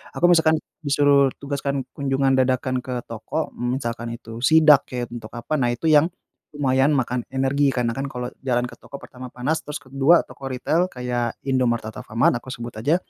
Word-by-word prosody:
aku -, -, +2 dB
misalkan 160 Hz, -2 st, +4 dB, 0.3 s
disuruh 140 Hz, -1 st, +4 dB
tugaskan 140 Hz, -1 st, -2 dB
kunjungan 135 Hz, -1 st, +1 dB
dadakan 130 Hz, 0 st, +1 dB
ke 125 Hz, -2 st, -4 dB
toko, 115 Hz, +8 st, -4 dB
mmm, 120 Hz, +1 st, -1 dB
misalkan 115 Hz, -2 st, -4 dB
itu 115 Hz, 0 st, -10 dB
sidak, 155 Hz, -1 st, +6 dB
ya, 125 Hz, -1 st, -2 dB
untuk 115 Hz, -2 st, -7 dB
apa, 120 Hz, +6 st, -3 dB
nah, 120 Hz, -, +2 dB
itu 160 Hz, +7 st, -3 dB
yang 150 Hz, +2 st, +6 dB, 0.5 s
lumayan 135 Hz, +1 st, +2 dB
makan 125 Hz, -1 st, -1 dB
energi. 135 Hz, +2 st, +1 dB
Karena 120 Hz, -2 st, 0 dB
kan 140 Hz, 0 st, -2 dB
kalau 125 Hz, -1 st, -5 dB
jalan 125 Hz, -2 st, +1 dB
ke 125 Hz, -, -9 dB
toko, 140 Hz, -, -11 dB
pertama 125 Hz, 0 st, -10 dB
panas, 130 Hz, +6 st, -1 dB
terus 150 Hz, -, -7 dB
kedua 135 Hz, +5 st, +3 dB
toko 135 Hz, -, -9 dB
ritel 165 Hz, +8 st, +1 dB
kayak 125 Hz, -2 st, -2 dB
Indomaret, 125 Hz, -4 st, +1 dB
atau 110 Hz, -, -9 dB
Alfamart 120 Hz, +1 st, +2 dB
aku 125 Hz, -, -22 dB
sebut 120 Hz, -2 st, -7 dB
aja, 145 Hz, +9 st, +2 dB
130 Hz, 185 wpm, -23 LUFS, 120-140 Hz, 0.5 s, sidak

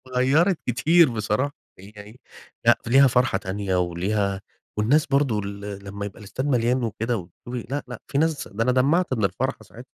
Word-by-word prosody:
غيّرت 155 Hz, +8 st, +3 dB
كتير 155 Hz, +7 st, +4 dB
بصراحة، 115 Hz, +5 st, -1 dB, 0.2 s
يعني 105 Hz, +4 st, -13 dB, 0.5 s
لأ -, -, +6 dB
ف -, -, -8 dB
ليها 135 Hz, +3 st, +7 dB
فرحة 125 Hz, -4 st, +2 dB
تانية 95 Hz, 0 st, -3 dB
وليها 95 Hz, +3 st, -1 dB, 0.4 s
والناس 135 Hz, +9 st, +3 dB
برضه 140 Hz, -6 st, +1 dB
ال 100 Hz, 0 st, -6 dB
لمّا 100 Hz, +1 st, -5 dB
يبقى 100 Hz, +1 st, -9 dB
الاستاد 105 Hz, +6 st, -5 dB
مليان 125 Hz, -1 st, +1 dB
وكده 115 Hz, +1 st, -2 dB
وتشوفي 110 Hz, +7 st, -8 dB
لأ، 145 Hz, +2 st, -2 dB
لأ، 125 Hz, -2 st, -8 dB
في 140 Hz, -, -3 dB
ناس 160 Hz, 0 st, 0 dB
ده 110 Hz, +3 st, -2 dB
أنا 125 Hz, -, +2 dB
دمّعت 140 Hz, +6 st, +2 dB
من 110 Hz, -5 st, +1 dB
الفرحة 95 Hz, -1 st, -2 dB
ساعتها. -, -, -13 dB
115 Hz, 175 wpm, -24 LUFS, 100-135 Hz, 0.5 s, ليها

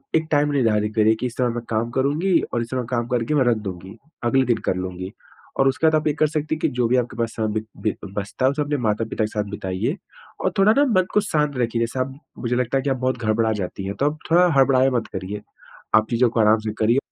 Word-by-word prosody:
एक 160 Hz, 0 st, +1 dB
टाइम 145 Hz, -1 st, +3 dB
निर्धारित 110 Hz, -5 st, +1 dB
करिए, 110 Hz, 0 st, +4 dB
कि 110 Hz, -, -4 dB
इस 125 Hz, -1 st, -4 dB
समय 125 Hz, -1 st, +2 dB
मैं 120 Hz, -, -4 dB
काम 115 Hz, +1 st, 0 dB
करूँगी 150 Hz, +9 st, +2 dB
और 120 Hz, -, +1 dB
इस 115 Hz, -, -5 dB
समय 125 Hz, -2 st, -2 dB
काम 120 Hz, -2 st, -1 dB
करके 125 Hz, +4 st, 0 dB
मैं 135 Hz, -, +4 dB
रख 120 Hz, -2 st, +3 dB
दूँगी, 95 Hz, +3 st, -8 dB, 0.3 s
अगले 130 Hz, +3 st, +3 dB
दिन 120 Hz, -2 st, +2 dB
कर -, -, +1 dB
लूँगी, 95 Hz, +1 st, -5 dB, 0.5 s
और 135 Hz, -, +4 dB
उसके 160 Hz, +4 st, +2 dB
बाद 155 Hz, -, +4 dB
आप 155 Hz, 0 st, +1 dB
ये 150 Hz, -, +2 dB
कर 155 Hz, +1 st, +2 dB
सकती 155 Hz, +1 st, -2 dB
हैं 155 Hz, -, -9 dB
कि -, -, +3 dB
जो 120 Hz, -, +3 dB
भी 125 Hz, -, +2 dB
आपके 120 Hz, -1 st, -2 dB
पास 115 Hz, -1 st, -1 dB
समय 110 Hz, -1 st, -1 dB
बि 110 Hz, -, -12 dB, 0.2 s
बि 110 Hz, -, 0 dB
बचता 100 Hz, +6 st, -3 dB
है, 130 Hz, -, +4 dB
उसे 150 Hz, +1 st, -2 dB
अपने 145 Hz, 0 st, -1 dB
माता-पिता 110 Hz, +1 st, -1 dB
के -, -, +1 dB
साथ 105 Hz, -, -1 dB
बिताइए। 95 Hz, -2 st, -2 dB, 0.5 s
और -, -, +2 dB
थोड़ा 205 Hz, +2 st, +6 dB
ना 285 Hz, -, +5 dB
मन 185 Hz, -8 st, +2 dB
को -, -, +5 dB
शांत 150 Hz, -8 st, 0 dB
रखिए, 120 Hz, -1 st, 0 dB
जैसे 115 Hz, +3 st, -2 dB
आप 130 Hz, +1 st, -3 dB, 0.2 s
मुझे 120 Hz, 0 st, -1 dB
लगता 125 Hz, +1 st, 0 dB
है -, -, +1 dB
कि, 145 Hz, -, 0 dB
आप 135 Hz, -, +1 dB
बहुत 130 Hz, 0 st, -1 dB
घड़बड़ा 110 Hz, -1 st, +1 dB
जाती 95 Hz, -1 st, -4 dB
हैं। 100 Hz, -, -4 dB
तो 140 Hz, -, +2 dB
आप, 155 Hz, -, -10 dB
थोड़ा 180 Hz, +2 st, +6 dB
हड़बड़ाया 135 Hz, -1 st, +4 dB
मत 120 Hz, -3 st, -1 dB
करिए। 100 Hz, +2 st, -5 dB, 0.5 s
आप 110 Hz, 0 st, +5 dB
चीज़ों 120 Hz, +1 st, +3 dB
को 115 Hz, -, 0 dB
आराम 110 Hz, 0 st, +5 dB
से 110 Hz, -, -1 dB
करिए, 115 Hz, +4 st, +3 dB
120 Hz, 265 wpm, -22 LUFS, 110-140 Hz, 0.5 s, थोड़ा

